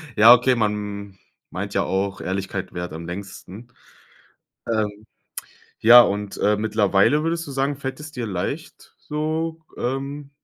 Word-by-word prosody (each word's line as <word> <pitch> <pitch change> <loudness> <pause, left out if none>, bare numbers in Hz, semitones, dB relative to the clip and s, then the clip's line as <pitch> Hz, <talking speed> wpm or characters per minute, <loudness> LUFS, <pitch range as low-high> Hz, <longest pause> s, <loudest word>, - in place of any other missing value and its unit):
Ja, 115 +3 +9
okay, 125 +1 +3
man 105 -3 -3 0.3
meint - - -5
ja - - +1
auch, 95 +1 -2
Ehrlichkeit 95 0 -4
währt 90 -1 -5
am 80 +1 -7
längsten. 100 +5 -9 1.0
Ähm. 105 -1 -2 0.8
Ja, 120 +2 +9
und, 100 -2 -2
äh, 105 +1 +2
mittlerweile 110 +6 +2
würdest 165 +1 -2
du 140 - -8
sagen, 135 +1 -1
fällt 135 0 -6
es 155 +1 -8
dir 125 -5 -4
leicht, 95 -3 -5
so, 160 +2 -3 0.2
ähm 140 +3 -4
110 Hz, 140 wpm, -22 LUFS, 100-135 Hz, 1.0 s, Ja